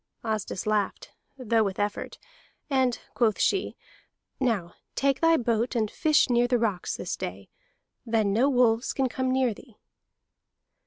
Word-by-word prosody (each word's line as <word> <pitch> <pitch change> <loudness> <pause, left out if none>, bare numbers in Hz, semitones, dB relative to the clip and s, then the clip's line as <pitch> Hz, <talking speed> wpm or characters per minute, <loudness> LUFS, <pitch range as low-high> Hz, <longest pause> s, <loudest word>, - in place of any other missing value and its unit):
Asdis 215 -4 -3
laughed, 210 -2 -1 0.3
though 230 -3 +2
with 195 -2 -3
effort, 205 0 -3 0.5
and 260 -3 +2
quoth 225 -4 +1
she: 390 - +1 0.6
"Now 220 -10 0 0.2
take 275 -1 +1
thy 330 0 +5
boat 235 0 0
and 215 -3 0
fish 310 -2 +3
near 245 -1 +3
the 245 0 +2
rocks 215 -6 -1
this 180 - -4
day. 95 +2 -7 0.5
Then 220 -4 +1
no 250 +7 +3
wolves 245 -3 +2
can 265 -1 +1
come 260 +1 -2
near 260 -3 +2
thee." 230 +1 -17
235 Hz, 145 wpm, -27 LUFS, 215-260 Hz, 0.6 s, thy